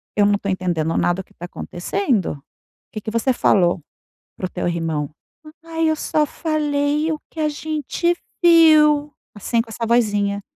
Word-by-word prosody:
eu 205 - +4
não 205 0 +3
tô 200 - -5
entendendo 175 -4 -1
nada 175 +2 +1
o - - -13
que - - -26
tá 175 - -8
acontecendo, 180 - -2 0.5
que 215 - -6
que 220 - -5
você 230 +4 +1
falou 175 -7 +2 0.6
para - - -3
o - - -4
teu 180 - -3
irmão?". 165 -4 -2 0.5
"Ai 325 -1 0
eu 315 - +2
só 305 0 0
falei 300 0 0
o 310 - -3
que 320 - -10
a 305 -1 +1
gente 310 +3 -1 0.3
viu", 305 -3 +6 0.2
assim, 230 +3 0
com 230 - -11
essa 230 +1 -4
vozinha. 205 -4 +1
230 Hz, 170 wpm, -21 LUFS, 185-305 Hz, 0.6 s, viu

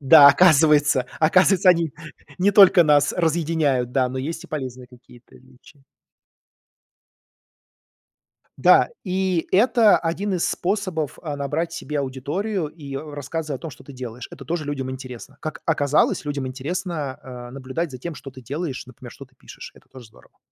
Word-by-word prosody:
Да, 140 +1 +8
оказывается. 150 -5 +4
Оказывается, 185 +4 +4
они 165 -4 +1 0.5
не 195 +3 +2
только 190 -3 +7
нас 145 -1 +3
разъединяют, 160 -6 0
да, 130 -2 +1
но 130 +1 -5
есть 165 +5 -5
и - - -10
полезные 130 -5 -6
какие-то 120 -1 -19
отличия. 130 +2 -21 2.8
Да, - - +5
и 185 -3 -1
это 225 +1 +4
один 190 +4 -2
из 175 - 0
способов, 185 -6 -3
а, 150 -4 -5
набрать 150 +4 -3
себе 150 -2 -4
аудиторию 150 +9 -3
и, 145 -3 -9
э, 150 +1 -7
рассказы 150 +2 -5
о 130 - -5
том, 165 - -7
что 135 - -14
ты 140 - -12
делаешь. 125 -2 -8
Это 135 - -11
тоже 165 -1 -3
людям 135 -2 -4
интересно. 130 +1 -9
Как 155 -1 -6
оказалось, 150 -1 +1
людям 145 -2 -3
интересно, 150 +1 -4 0.3
а, - - -12
наблюдать 135 +5 -4
за 130 - -9
тем, 170 +4 -6
что 135 - -10
ты 130 - -13
делаешь, 140 +1 -5
например, 125 -1 -12
что 135 - -12
ты 130 0 -31
пишешь. - - -12
Это - - -21
тоже 130 -3 -14
здорово. 110 - -23
145 Hz, 160 wpm, -22 LUFS, 130-170 Hz, 2.8 s, Да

